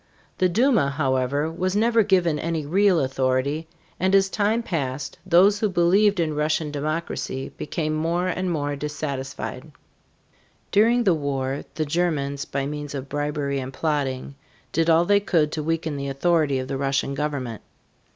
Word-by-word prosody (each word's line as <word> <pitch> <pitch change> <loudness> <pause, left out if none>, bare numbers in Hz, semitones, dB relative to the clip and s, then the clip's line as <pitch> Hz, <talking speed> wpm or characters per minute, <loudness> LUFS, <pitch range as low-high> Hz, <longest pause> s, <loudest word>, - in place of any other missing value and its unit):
The 185 - +3
Duma, 230 - +3
however, 140 +1 0
was 185 +3 -2
never 230 +2 +4
given 180 -7 +2
any 165 -2 -2
real 190 +3 +3
authority, 135 +4 0 0.3
and 190 +2 +3
as 195 0 +4
time 215 +4 +1
passed 135 - -3
those 190 +4 +5
who 215 - +1
believed 190 +3 +3
in 160 -2 0
Russian 150 0 0
democracy 150 -2 -3
became 155 +1 -3
more 165 +3 0
and 185 0 -1
more 145 -3 -1
dissatisfied. 140 -2 -5 1.0
During 230 +4 +4
the 190 -5 +4
war 140 -3 -2
the 155 - -1
Germans 145 -3 -1
by 135 -1 -2
means 145 0 -5
of 135 0 -6
bribery 145 -1 -2
and 130 0 -5
plotting 140 -3 -2 0.4
did 165 0 +1
all 165 +1 +5
they 205 +2 +4
could 165 -7 +1
to 155 - -3
weaken 160 -1 -2
the 140 0 -4
authority 150 0 +1
of 130 0 -3
the 135 - -3
Russian 135 0 0
government. 140 -6 -3
155 Hz, 155 wpm, -24 LUFS, 140-180 Hz, 1.0 s, those